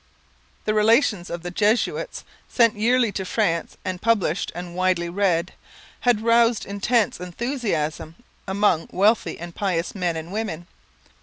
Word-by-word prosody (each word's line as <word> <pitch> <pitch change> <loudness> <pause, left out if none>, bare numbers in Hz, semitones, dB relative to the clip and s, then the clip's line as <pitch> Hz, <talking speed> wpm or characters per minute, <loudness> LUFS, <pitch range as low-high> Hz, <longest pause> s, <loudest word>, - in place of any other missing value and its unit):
The 215 - +1
Relations 215 -3 +3
of 170 0 -5
the 175 - -5
Jesuits, 220 - 0 0.3
sent 230 -3 +3
yearly 235 +1 +2
to 195 - -3
France 180 -4 -1
and 185 -1 -3
published 205 -7 +1
and 175 0 -6
widely 180 -2 +1
read, 180 -2 0 0.5
had 245 -4 +2
roused 230 0 +3
intense 205 +1 0
enthusiasm 180 - -3 0.3
among 190 -4 +1
wealthy 210 +4 +2
and 170 0 -8
pious 180 -4 -1
men 175 -4 -1
and 160 +2 -7
women. 195 -6 -3
195 Hz, 135 wpm, -23 LUFS, 175-225 Hz, 0.5 s, Relations